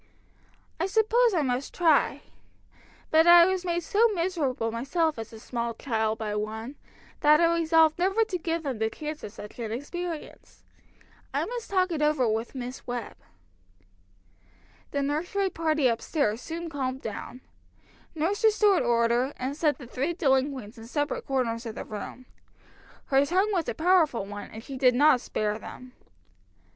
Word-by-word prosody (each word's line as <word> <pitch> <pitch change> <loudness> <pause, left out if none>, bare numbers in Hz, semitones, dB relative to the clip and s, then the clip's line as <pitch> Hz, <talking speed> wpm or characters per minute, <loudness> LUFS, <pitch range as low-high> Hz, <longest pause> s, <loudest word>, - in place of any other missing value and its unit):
"I 355 - +1
suppose 445 +2 +3
I 315 - +2
must 255 0 -2
try. 325 -4 +3 0.9
But 320 +1 +5
I 345 0 +9
was 375 0 0
made 345 -1 -1
so 455 +3 +3
miserable 305 -10 -1
myself 280 +5 -1
as 225 - -7
a 225 - -11
small 235 0 -4
child 220 -3 -1
by 215 -2 -3
one, 220 +5 -4 0.4
that 300 +1 +5
I 335 0 +4
resolved 325 -1 +3
never 390 +5 +3
to 425 -5 -3
give 330 0 -2
them 265 -6 -3
the 220 0 +1
chance 305 +4 -6
of - - -6
such 210 +3 -11
an 225 -2 -4
experience. 325 +6 -6 0.7
I - - +1
must 480 -1 -6
talk 370 -2 +1
it 315 -3 -2
over 300 -5 +2
with 225 +4 -2
Miss 250 0 -7
Webb." 245 -3 -4 1.7
The 285 -1 -1
nursery 355 +7 -1
party 310 -4 +1
up 230 -2 0
stairs 235 -7 -1
soon 335 +3 -5
calmed 265 -4 -4
down. 225 +4 -7 0.7
Nurse 345 +8 -1
restored 425 -3 +4
order, 235 +3 +2
and 260 +2 -3
set 300 -1 +1
the 270 - -10
three 270 +7 -2
delinquents 265 - 0
in 225 - -10
separate 290 +3 -2
corners 240 -3 -1
of 225 - -6
the - - -6
room. 215 +4 -8 0.8
Her 270 0 +3
tongue 375 +8 +1
was 345 -5 0
a - - -3
powerful 320 - +3
one, 205 +1 -8
and 220 +1 -10
she 270 +1 -7
did 255 -2 +4
not 285 -1 +5
spare 210 -2 -2
them. 250 +2 -11
285 Hz, 165 wpm, -27 LUFS, 235-340 Hz, 1.7 s, I